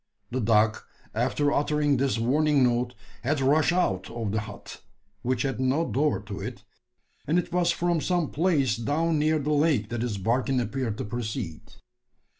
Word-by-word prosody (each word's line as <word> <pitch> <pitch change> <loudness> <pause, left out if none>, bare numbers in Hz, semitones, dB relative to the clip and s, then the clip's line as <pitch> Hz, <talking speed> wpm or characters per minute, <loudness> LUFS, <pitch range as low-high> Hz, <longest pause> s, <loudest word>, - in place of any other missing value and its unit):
The 130 +1 -1
dog, 110 0 +3 0.3
after 130 +5 +1
uttering 145 -1 +2
this 135 -1 +1
warning 140 +4 +3
note, 120 0 +1 0.3
had 140 +6 0
rushed 145 +5 +3
out 95 - 0
of 115 -3 -3
the 110 - 0
hut 105 -1 -9 0.4
which 125 0 0
had 135 -2 -2
no 135 +6 +1
door 150 +2 +1
to 105 -1 -7
it - - -6 0.6
and 160 +4 +2
it 175 -1 -1
was 175 -1 +2
from 170 -1 +1
some 175 +1 0
place 145 -8 +2
down 155 +6 0
near 155 +1 +2
the 150 0 -1
lake 145 -8 +2
that 120 -1 -3
his 115 -4 -2
barking 125 +6 +1
appeared 120 -2 -2
to - - -3
proceed. 110 - -5
130 Hz, 170 wpm, -26 LUFS, 115-150 Hz, 0.6 s, dog